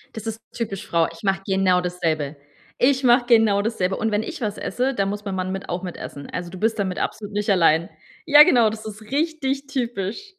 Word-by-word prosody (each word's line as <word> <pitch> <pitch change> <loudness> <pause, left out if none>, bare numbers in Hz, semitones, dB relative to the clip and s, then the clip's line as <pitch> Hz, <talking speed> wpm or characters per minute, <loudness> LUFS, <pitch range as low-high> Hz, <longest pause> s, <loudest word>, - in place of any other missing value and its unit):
Das 220 0 -7
ist 225 0 -4
typisch 210 -5 -4
Frau. 165 -1 +2
Ich 165 - -15
mache 195 -1 +1
genau 190 -2 +2
dasselbe. 160 -5 -2 0.4
Ich 265 +1 +2
mache 245 0 +5
genau 220 -4 +4
dasselbe. 195 -4 -1
Und 220 0 -1
wenn 210 +1 0
ich 255 - -7
was 210 -3 -2
esse, 260 +3 -1
dann 195 -3 0
muss 205 0 -4
mein 200 -2 -4
Mann 185 0 -2
mit 195 +1 -6
auch 175 +1 -3
mitessen. 155 -5 -7
Also 180 -1 -5
du 185 - -9
bist 225 0 0
damit 190 -2 -1
absolut 205 -1 -4
nicht 210 +1 -2
allein. 170 -3 +3 0.4
Ja, 295 -1 +9
genau, 245 -9 +4
das 220 0 -8
ist 215 0 -8
richtig 280 +1 -2
typisch. 245 - -3
205 Hz, 215 wpm, -22 LUFS, 185-240 Hz, 0.4 s, Ja